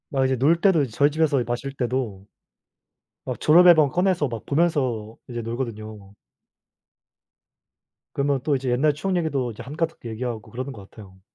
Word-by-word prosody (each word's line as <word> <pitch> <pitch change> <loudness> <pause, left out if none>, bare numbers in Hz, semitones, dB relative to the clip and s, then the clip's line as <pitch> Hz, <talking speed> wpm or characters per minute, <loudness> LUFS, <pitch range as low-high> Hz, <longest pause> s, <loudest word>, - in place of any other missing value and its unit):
막 135 -1 +1
이제 130 0 +1
놀 150 +7 +3
때도 185 -4 +4
이제 130 - -5
저희 140 +6 +3
집에서 150 -3 +1
마실 120 +3 -3
때도 120 -7 -3 1.0
막 - - -4
졸업 175 +4 +6
앨범 160 -5 +6
꺼내서 180 -3 +1
막 115 -3 -7
보면서 130 -9 0
이제 120 -1 -4
놀거든요. 110 -4 -6 2.0
그러면 140 0 0
또 145 - +1
이제 130 -1 -2
옛날 140 +5 +2
추억 185 +6 -2
얘기도 140 -7 -1
이제 110 - -10
한가득 160 +4 -3
얘기하고 115 0 -4
그러는 130 +5 -7
것 100 -4 -13
같아요. 95 -3 -15
130 Hz, 340 characters per minute, -23 LUFS, 115-155 Hz, 2.0 s, 졸업